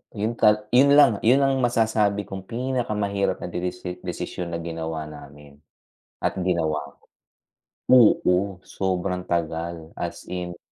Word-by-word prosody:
yun 105 Hz, +3 st, -1 dB
kat 105 Hz, 0 st, +3 dB
yun 140 Hz, +3 st, +6 dB
lang, 120 Hz, -8 st, +6 dB
yun 130 Hz, +4 st, +5 dB
ang 135 Hz, -1 st, +2 dB
masasabi 110 Hz, -4 st, +1 dB
kong 95 Hz, -1 st, -7 dB
pinakamahirap 110 Hz, -5 st, -1 dB
na -, -, -5 dB
desis 90 Hz, 0 st, -4 dB
desisyon 90 Hz, -1 st, -4 dB
na 85 Hz, -, -3 dB
ginawa 80 Hz, -1 st, -4 dB
namin 70 Hz, -1 st, -13 dB, 0.7 s
at -, -, 0 dB
ginawa. 80 Hz, -5 st, -1 dB, 0.9 s
Oo 100 Hz, -6 st, +4 dB
sobrang 90 Hz, -1 st, -2 dB
tagal 85 Hz, -1 st, -3 dB
as 85 Hz, -, -5 dB
in. 90 Hz, -1 st, -5 dB
95 Hz, 125 wpm, -24 LUFS, 85-110 Hz, 0.9 s, yun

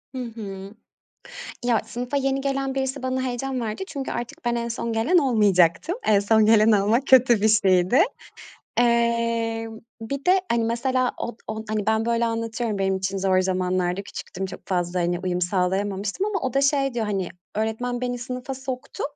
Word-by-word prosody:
Hı 255 Hz, -, -3 dB
hı. 200 Hz, -4 st, -7 dB, 0.9 s
Ya, 235 Hz, -3 st, +3 dB
sınıfa 245 Hz, +4 st, -4 dB
yeni 270 Hz, 0 st, 0 dB
gelen 275 Hz, -1 st, -1 dB
birisi 265 Hz, 0 st, -2 dB
bana 260 Hz, 0 st, -1 dB
heyecan 255 Hz, +1 st, -2 dB
verdi. 220 Hz, -, -4 dB
Çünkü 280 Hz, -4 st, -5 dB
artık 240 Hz, +1 st, -6 dB
ben 240 Hz, 0 st, +1 dB
en 235 Hz, 0 st, -2 dB
son 230 Hz, 0 st, -3 dB
gelen 240 Hz, +12 st, +3 dB
olmayacaktım. 210 Hz, -, +3 dB
En 205 Hz, -2 st, +5 dB
son 215 Hz, +1 st, +4 dB
gelen 220 Hz, 0 st, +5 dB
olmak 215 Hz, +7 st, +2 dB
kötü 245 Hz, -4 st, +6 dB
bir 220 Hz, -, +3 dB
şeydi. 190 Hz, +2 st, +4 dB, 0.8 s
Eee, 230 Hz, -1 st, +1 dB, 0.3 s
bir 275 Hz, +5 st, -5 dB
de 370 Hz, +1 st, +4 dB
hani, 235 Hz, -1 st, +2 dB
mesela, 250 Hz, +2 st, 0 dB
od 235 Hz, -1 st, -5 dB
o, -, -, -2 dB
hani, 215 Hz, -1 st, -2 dB
ben, 220 Hz, 0 st, +2 dB
böyle, 235 Hz, 0 st, +1 dB
anlatıyorum, 230 Hz, -1 st, -2 dB
benim 195 Hz, 0 st, +1 dB
için 190 Hz, +1 st, -2 dB
zor 185 Hz, -1 st, +2 dB
zamanlardı, 185 Hz, 0 st, 0 dB
küçüktüm, 190 Hz, -1 st, -6 dB
çok -, -, -9 dB
fazla, 180 Hz, -1 st, 0 dB
hani, 175 Hz, 0 st, 0 dB
uyum 180 Hz, -1 st, -1 dB
sağlayamamıştım 195 Hz, -, -1 dB
ama 415 Hz, -2 st, -1 dB
o 260 Hz, -1 st, -3 dB
da 275 Hz, -, +3 dB
şey 275 Hz, -2 st, +2 dB
diyor: 225 Hz, -3 st, -1 dB
"Hani, 195 Hz, -4 st, -2 dB, 0.3 s
öğretmen 220 Hz, +3 st, -2 dB
beni 245 Hz, -1 st, -2 dB
sınıfa 250 Hz, +1 st, -5 dB
soktu. 260 Hz, -1 st, -6 dB
230 Hz, 170 wpm, -24 LUFS, 200-255 Hz, 0.9 s, kötü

